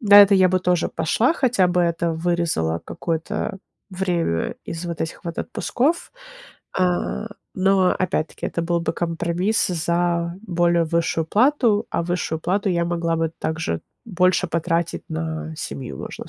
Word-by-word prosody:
На 205 -3 +7
это 200 0 +5
я 185 -1 +5
бы 185 0 +1
тоже 180 -2 +1
пошла, 190 - +1
хотя 245 -9 +3
бы 180 0 +2
это 170 -1 0
вырезало 165 - 0
какое-то 165 -1 -3 0.4
время 175 - -1
из 165 +1 -4
вот 170 -1 -5
этих 160 - -4
вот 170 -1 -5
отпусков, 285 - -1 0.6
а, 180 +3 0 0.3
но 195 +1 +3
опять-таки 175 -4 -2
это 170 - -2
был 170 0 +1
бы 165 -1 -1
компромисс 170 +5 0
за 170 0 0
более 175 -4 +2
высшую 165 0 0
плату, 235 - +3
а - - 0
высшую 170 -2 -2
плату 195 +5 0
я 170 -1 +1
могла 170 -1 0
бы 165 -1 0
также 160 - -2 0.3
больше 185 -2 +2
потратить 165 0 -1
на 160 0 -3
семью, 130 - -6
можно - - -7
170 Hz, 145 wpm, -22 LUFS, 165-185 Hz, 0.6 s, На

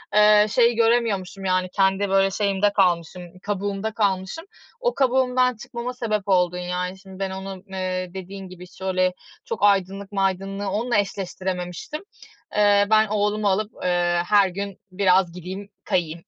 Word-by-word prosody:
eee, 210 0 +7
şeyi 235 +1 +3
göremiyormuşum. 225 -5 +1
Yani 185 0 +1
kendi, 195 0 +2
böyle, 195 0 +3
şeyimde 200 0 +1
kalmışım, 180 -2 +1 0.2
kabuğumda 205 +1 -2
kalmışım. 200 - -1 0.3
O - - 0
kabuğumdan 255 -1 +2
çıkmama 240 +2 -6
sebep 215 -5 -2
oldun 180 -2 +2
yani. 180 +1 -3
Şimdi 190 -1 -13
ben 195 -1 -1
onu, 190 0 -7
eee, 185 -1 -3
dediğin 190 0 -8
gibi, 180 0 -11
şöyle 185 0 -1 0.3
çok 465 - -4
aydınlık 195 0 +2
maydınlığı 195 0 -1
onunla 220 +3 0
eşleştirememiştim. 185 - -3 0.5
Eee, 205 -1 +4
ben 220 0 +5
oğlumu 210 0 0
alıp, 210 +3 0
eee, 175 -1 +2
her 205 -1 +5
gün 200 +1 -5
biraz 185 -1 +3
gideyim, 185 +3 -7
kayayım. 165 -1 -1
195 Hz, 140 wpm, -23 LUFS, 185-210 Hz, 0.5 s, eee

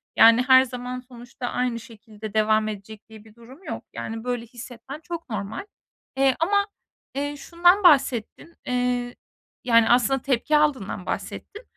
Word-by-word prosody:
Yani, 230 +2 +7
her 260 0 +7
zaman 250 0 -6
sonuçta 245 0 -9
aynı 245 -2 -1
şekilde 215 -1 -11
devam 215 0 +2
edecek 210 +1 -8
diye 220 -1 -13
bir 220 0 -19
durum 255 +9 -16
yok. - - -6
Yani, 225 0 -6
böyle 245 -1 -3
hissetmen 245 +4 -10
çok 335 -3 -7
normal, 210 - -5 0.5
eee, 270 -1 +3
ama, 400 +4 +2 0.5
eee, 290 +1 -2
şundan 350 +5 +3
bahsettin. 275 0 +2
Eee, 245 -1 -1 0.5
yani, 230 -2 +4
aslında 250 +2 +3
tepki 280 +3 +1
aldığından 260 -11 0
bahsettin 425 +4 -6
245 Hz, 145 wpm, -24 LUFS, 225-275 Hz, 0.5 s, Yani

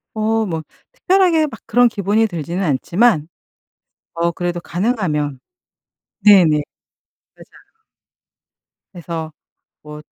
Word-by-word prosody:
어 220 0 0
뭐 160 -4 -4 0.3
특별하게 365 -9 +2
막 225 -6 -10
그런 245 +2 +4
기분이 210 0 0
들지는 175 0 -4
않지만 170 - +1 0.9
어 170 0 0
그래도 175 0 -3
가능하면 170 - -2 0.9
네네 195 -5 +7 0.9
맞아요. 445 -1 -21 1.1
그래서 165 -2 -6 0.5
뭐 150 0 -10
185 Hz, 205 characters per minute, -18 LUFS, 165-225 Hz, 1.1 s, 네네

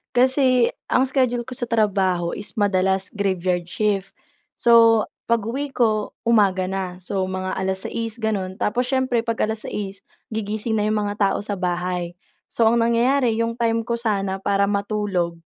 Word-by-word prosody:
Kasi 255 -1 +4 0.2
ang 255 - +3
schedule 255 -3 +1
ko 255 - -12
sa 240 -1 -2
trabaho 190 -6 +1
is 205 - -6
madalas 190 -2 +1
graveyard 185 -3 -1
shift. 195 0 -1 0.4
So, 230 -2 +5 0.3
pag-uwi 235 +6 0
ko, 215 -3 +1
umaga 200 -5 +3
na. 185 -1 -4
So, 190 +1 -3
mga 185 0 -3
6:00 190 +4 -2
gano'n. 200 -5 -2
Tapos, 245 +4 0
siyempre 260 -3 +1
'pag 230 -1 -1
6:00 210 -2 -4 0.3
gigising 215 +1 -1
na 210 - +1
yung 215 - +1
mga 205 0 -2 0.2
tao - - -1
sa 205 - -1
bahay. 180 -1 -2 0.3
So, 230 - +1
ang 235 - +2
nangyayari, 235 +1 +2
yung 230 0 0
time 230 -1 +1
ko 235 - -2
sana 195 -4 -1
para 200 0 +1
matulog 200 -4 -1
210 Hz, 150 wpm, -22 LUFS, 190-235 Hz, 0.4 s, So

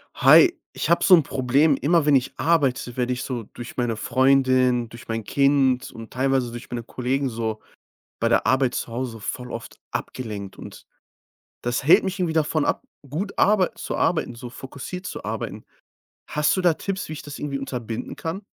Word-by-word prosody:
Hi, 360 -1 +7 0.2
ich - - -3
habe 170 - +3
so 190 - +6
'n 165 - +4
Problem. 135 +3 +2
Immer 165 +2 +2
wenn 145 - +6
ich 130 - +1
arbeite, 130 -5 +1
werde 125 0 0
ich 125 - -4
so 125 -3 -4
durch 120 0 -9
meine 120 -2 0
Freundin, 130 0 +3
durch 120 0 -12
mein 115 0 -3
Kind 135 0 +2
und 115 -1 -10
teilweise 130 -1 +1
durch 120 +1 -9
meine 120 -1 -3
Kollegen 130 +3 -1
so 110 -2 -3 0.6
bei - - +2
der - - +2
Arbeit 130 -1 +2
zu - - -3
Hause 125 +1 -3
so 115 - -9
voll 125 +4 -5
oft 115 - -8
abgelenkt. 105 -6 -5
Und - - -11 0.8
das 120 +2 -1
hält 180 +8 +6
mich 190 0 -3
irgendwie 175 -3 0
davon 155 -1 +1
ab, - - -1 0.2
gut 180 +9 -3
arbeit 200 -3 +3
zu - - -4
arbeiten, 160 -7 0
so 120 +1 -8
fokussiert 140 +9 -8
zu - - -6
arbeiten. - - -5 0.6
Hast 150 -1 +1
du 185 - 0
da 175 -2 +4
Tipps, 195 -1 -4
wie 155 - -4
ich - - -7
das 145 -1 -8
irgendwie 140 -2 -3
unterbinden 120 -4 -5
kann? 190 +5 -5
130 Hz, 190 wpm, -24 LUFS, 120-155 Hz, 0.8 s, Hi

